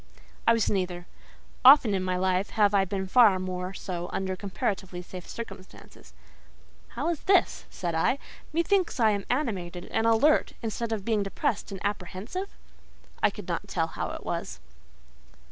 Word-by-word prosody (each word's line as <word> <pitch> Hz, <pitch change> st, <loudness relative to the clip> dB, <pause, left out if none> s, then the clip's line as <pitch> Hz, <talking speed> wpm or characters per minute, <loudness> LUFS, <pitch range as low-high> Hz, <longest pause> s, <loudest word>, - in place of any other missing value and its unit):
I 230 Hz, -, +7 dB
was 230 Hz, -2 st, +1 dB
neither. 180 Hz, -3 st, -1 dB, 0.6 s
Often 260 Hz, -5 st, +8 dB
in 190 Hz, -, 0 dB
my 185 Hz, -1 st, -1 dB
life 185 Hz, +2 st, +1 dB
have 210 Hz, -2 st, +3 dB
I 195 Hz, -1 st, +4 dB
been 190 Hz, +1 st, -3 dB
far 210 Hz, -1 st, +6 dB
more 185 Hz, 0 st, -4 dB
so 175 Hz, -1 st, -5 dB
under 190 Hz, -1 st, -2 dB
comparatively 190 Hz, -2 st, -3 dB
safe 180 Hz, 0 st, -10 dB
circumstances. 195 Hz, -5 st, -10 dB, 0.8 s
"How -, -, 0 dB
is 335 Hz, -4 st, -1 dB
this?" 385 Hz, 0 st, +3 dB
said 175 Hz, -2 st, -4 dB
I. 165 Hz, +11 st, +2 dB, 0.3 s
"Methinks 340 Hz, 0 st, +1 dB
I 220 Hz, -2 st, +5 dB
am 200 Hz, -1 st, -2 dB
animated 190 Hz, -, -2 dB
and 225 Hz, -, +1 dB
alert, 235 Hz, +7 st, +4 dB
instead 225 Hz, +1 st, -3 dB
of 210 Hz, -3 st, -3 dB
being 220 Hz, -3 st, +1 dB
depressed 200 Hz, +1 st, -2 dB
and 195 Hz, -, -6 dB
apprehensive?" 205 Hz, -, -4 dB, 0.7 s
I -, -, +5 dB
could -, -, -10 dB
not -, -, -3 dB
tell 165 Hz, 0 st, -1 dB
how -, -, -4 dB
it -, -, -7 dB
was. -, -, -4 dB
200 Hz, 160 wpm, -27 LUFS, 185-230 Hz, 0.8 s, Often